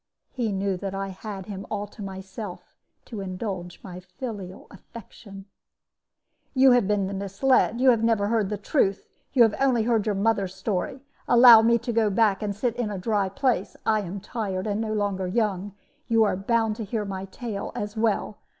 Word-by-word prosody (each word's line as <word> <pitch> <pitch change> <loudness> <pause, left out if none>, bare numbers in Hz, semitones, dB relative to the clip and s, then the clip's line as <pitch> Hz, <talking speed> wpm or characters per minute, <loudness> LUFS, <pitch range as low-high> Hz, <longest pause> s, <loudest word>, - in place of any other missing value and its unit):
He 235 -4 -2
knew 195 -1 -1
that 195 +1 -5
I 195 0 -3
had 195 0 -7
him 195 -1 -6
all 205 -1 -3
to 205 +1 -13
myself, 190 0 -8 0.3
to 220 -4 -7
indulge 185 -2 -5
my 180 -2 -8
filial 190 0 -8
affection. 195 -1 -12 1.1
"'You 265 0 +6
have 245 -5 +4
been 200 -1 0
misled; 220 +5 +2
you 260 0 +6
have 230 -2 +1
never 225 -3 +2
heard 220 -4 +1
the 210 - -2
truth; 200 -2 0 0.3
you 250 -4 +7
have 225 -2 +3
only 260 -4 +3
heard 225 -2 +1
your 210 - +1
mother's 200 -2 0
story. 200 +6 -3 0.3
Allow 240 -2 +9
me 235 +1 +4
to 235 +1 -4
go 220 -2 +3
back 200 -1 +2
and 210 -1 -2
to 200 - -19
sit 240 0 0
in 240 -3 -1
a 205 - -4
dry 200 0 0
place; 245 -2 -1
I 215 -1 +2
am 195 +1 -6
tired, 200 -3 -4
and 210 0 -1
no 220 -1 -2
longer 200 -3 -1
young; 200 -1 -1 0.3
you 225 -2 +4
are 205 - +1
bound 220 +2 0
to 225 - -4
hear 210 0 -3
my 195 -1 -5
tale 205 +1 -6
as 205 +1 -4
well. 220 -1 -1
205 Hz, 190 wpm, -25 LUFS, 195-230 Hz, 1.1 s, Allow